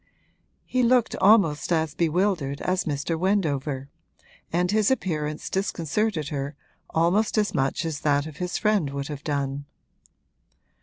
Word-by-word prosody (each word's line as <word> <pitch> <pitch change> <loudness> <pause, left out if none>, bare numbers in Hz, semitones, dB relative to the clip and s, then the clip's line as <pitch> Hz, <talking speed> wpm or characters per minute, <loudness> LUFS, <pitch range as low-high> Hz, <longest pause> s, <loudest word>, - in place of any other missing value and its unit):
He 255 - 0
looked 245 -1 +3
almost 190 -8 +4
as 160 -2 +1
bewildered 165 -4 0
as 185 0 0
Mr. 155 +2 -2
Wendover, 150 -8 0 0.6
and 180 +2 +1
his 215 0 +3
appearance 155 - -2
disconcerted 185 -2 -1
her 140 0 -4 0.3
almost 185 +8 +2
as 210 -1 +1
much 135 +5 0
as 160 -3 -3
that 145 -1 +1
of 155 -2 -9
his 180 +1 -2
friend 210 -8 +1
would 140 +1 -4
have 145 -1 -6
done. 140 -2 -2
160 Hz, 135 wpm, -25 LUFS, 145-195 Hz, 0.6 s, almost